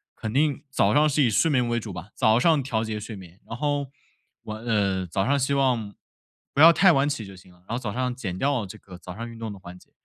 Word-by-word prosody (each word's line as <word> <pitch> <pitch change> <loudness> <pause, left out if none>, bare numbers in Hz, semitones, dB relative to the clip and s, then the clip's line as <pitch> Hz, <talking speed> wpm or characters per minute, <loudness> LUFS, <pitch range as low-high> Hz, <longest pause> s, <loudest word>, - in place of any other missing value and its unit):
肯 110 -1 -5
定 145 +1 +1
早 135 - +2
上 150 +1 +4
是 145 0 +2
以 120 - +3
睡 160 +9 +2
眠 125 -4 +2
为 120 0 0
主 105 -2 -7
吧， 90 +1 -8
早 110 +2 +3
上 155 +2 +3
调 115 -4 -1
节 110 -1 -4
睡 110 +1 -7
眠。 95 -1 -13
然 115 - -6
后 145 0 -1 0.6
晚 110 +1 -7
呃， 100 -5 0
早 95 +3 -1
上 140 +3 +2
希 135 +1 0
望 125 -7 0 0.6
不 140 - +2
要 165 +1 +10
太 185 +3 +5
晚 140 -3 +2
起 140 -7 -4
就 95 0 -11
行 95 0 -17
了， 90 - -22
然 - - -30
后 115 - -1
早 115 -5 -4
上 125 +2 -2
减 95 -8 -5
掉 135 -4 0
这 95 - -10
个 90 -2 -13
早 90 0 -10
上 115 +3 -6
运 115 - -11
动 115 -1 -5
的 100 - -10
环 90 0 -11
节， - - -22
115 Hz, 285 characters per minute, -25 LUFS, 100-140 Hz, 0.6 s, 要